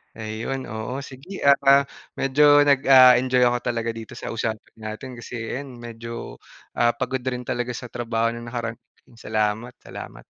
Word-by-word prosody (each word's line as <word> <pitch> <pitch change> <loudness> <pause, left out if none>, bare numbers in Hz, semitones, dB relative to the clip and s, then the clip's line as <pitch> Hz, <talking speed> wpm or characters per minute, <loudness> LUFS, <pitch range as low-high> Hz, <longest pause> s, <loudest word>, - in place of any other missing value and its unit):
Ayun, 110 +4 -4
oo. 125 +5 -5
Sige 140 +10 -9
at, 140 0 +6
ah, 140 0 +7 0.3
medyo 145 +2 +5
nag, 140 -2 +4
ah, 130 -2 +8
enjoy 125 -1 +2
ako 120 0 +3
talaga 115 -1 -2
dito 115 -1 -9
sa - - -6
usapan 110 -1 -4
natin, 110 +4 -7
kasi 120 - -8
ayan 125 +3 -5
medyo 115 - -8 0.3
ah, 120 -1 +2
pagod 130 +1 -2
rin 125 -1 -2
talaga 120 0 -3
sa 125 0 -8
trabaho 115 -1 -1
nung 120 0 -8
nakaraan 115 -1 -4 0.3
Salamat, 110 +1 -2
salamat. - - -10
120 Hz, 160 wpm, -23 LUFS, 115-130 Hz, 0.3 s, ah